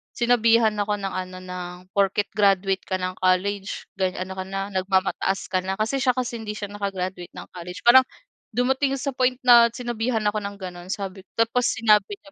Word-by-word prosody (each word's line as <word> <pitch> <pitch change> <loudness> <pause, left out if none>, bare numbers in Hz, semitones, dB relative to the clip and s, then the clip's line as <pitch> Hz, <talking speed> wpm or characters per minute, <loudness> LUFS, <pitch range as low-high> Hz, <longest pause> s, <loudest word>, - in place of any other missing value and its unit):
sinabihan 230 -2 +4
ako 205 0 0
ng 195 -1 -3
ano, 185 0 -5
ng, 180 -1 -6 0.2
"Porke't 200 +1 +1
graduate 195 -2 +3
ka 190 - -1
ng 185 0 -4
college 195 +2 0
gan 185 -1 0
ano 185 +1 -4
ka - - -2
na, 195 +1 -4
nagmamataas 190 0 0
ka 185 - +2
na." 190 +1 -2
Kasi 225 +6 0
siya 255 -2 +2
kasi 245 -2 -3
hindi 210 -1 -5
siya 205 -1 -6
naka-graduate 185 -3 -4
ng - - -9
college. 180 0 -8
Parang 255 +2 +8 0.5
dumating 265 +2 +1
sa 275 - -2
point 255 -1 +2
na 240 -1 +8
sinabihan 240 -2 -2
ako 215 +1 0
ng 200 0 -5
gano'n, 180 -2 -8
sabi 195 -1 -5
ko - - -76
tapos 245 +2 0
sinabi 210 -3 +3
niya 195 - -18
200 Hz, 190 wpm, -24 LUFS, 185-235 Hz, 0.5 s, Parang